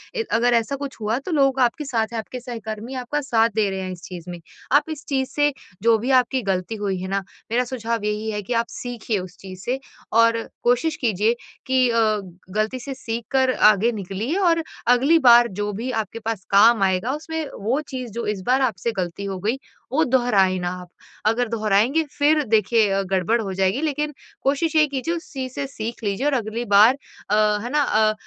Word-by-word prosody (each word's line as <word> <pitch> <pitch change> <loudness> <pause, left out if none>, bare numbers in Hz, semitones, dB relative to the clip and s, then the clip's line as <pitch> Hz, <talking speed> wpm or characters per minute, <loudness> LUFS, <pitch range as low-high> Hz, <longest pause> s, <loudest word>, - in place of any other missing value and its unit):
इ 455 - 0
अगर 240 +1 +3
ऐसा 230 +4 +1
कुछ 275 -1 -6
हुआ 215 +2 0
तो 340 - -6
लोग 275 -3 +2
आपके 255 +4 +1
साथ 225 -4 0
है - - -2
आपके 225 +3 -5
सहकर्मी 230 0 -6
आपका 255 +4 -2
साथ 230 -4 +2
दे 210 -3 +2
रहे 190 - -3
हैं 185 - -4
इस 180 -1 -9
चीज़ 180 -1 -8
में। 175 -1 -6 0.3
आप 290 +3 +4
इस 310 -2 -6
चीज़ 265 -2 -1
से 290 0 +2 0.3
जो 230 -1 +5
भी 255 +4 -1
आपकी 255 0 +3
गलती 195 0 -2
हुई 200 -3 -2
है 185 - -4
ना 195 0 -1 0.3
मेरा 245 +2 +2
सुझाव 230 -3 -3
यही 210 +1 -2
है 210 - -3
कि 205 +5 -4
आप 230 0 +1
सीखिए 235 -4 -3
उस 180 -1 -9
चीज़ 185 -1 -10
से 255 +5 -1 0.3
और 230 0 +4 0.2
कोशिश 250 +6 +2
कीजिए 220 -1 +2 0.3
कि 260 -1 +3
अ, 230 - +1 0.6
गलती 215 +4 0
से 270 +2 -6
सीख 230 -2 -5
कर 260 -1 +3
आगे 215 +1 +4
निकलिए 210 - -3
और 335 -4 +3 0.2
अगली 270 +7 +5
बार 240 -3 +7
जो 205 0 -1
भी 235 +6 -3
आपके 225 -1 -3
पास 220 -3 -4
काम 205 +1 +6
आएगा 190 +6 +1
उसमें 320 +1 -4 0.2
वो 230 +8 0
चीज़ 255 -4 -5
जो 235 +2 -4
इस 210 -2 -2
बार 260 +2 +3
आपसे 230 -3 0
गलती 180 +2 -3
हो 195 -1 -3
गई, 220 +8 -1 0.3
वो 310 +5 +3
दोहराए 210 -7 +3
ना 175 0 -2
आप। 180 - -11 0.4
अगर 225 +2 +2
दोहराएँगे 225 +7 +2
फिर 300 +1 +3
देखिए 220 -1 +3
अ, 195 0 +1
गड़बड़ 190 +4 +1
हो 195 -3 -4
जाएगी 190 +8 +1
लेकिन 300 -1 -1 0.3
कोशिश 290 +4 +1
यही 305 -1 +5
कीजिए 280 +4 -2
उस 335 - -8
चीज़ 260 -2 -4
से 280 0 -3
सीख 230 -3 -6
लीजिए 205 +6 -1
और 295 - +2
अगली 230 -1 -2
बार 210 +4 +6 0.4
अ, 210 - +3 0.3
है 240 - -4
ना 295 +1 +2
अ, 215 -3 +3
230 Hz, 210 wpm, -22 LUFS, 210-265 Hz, 0.6 s, बार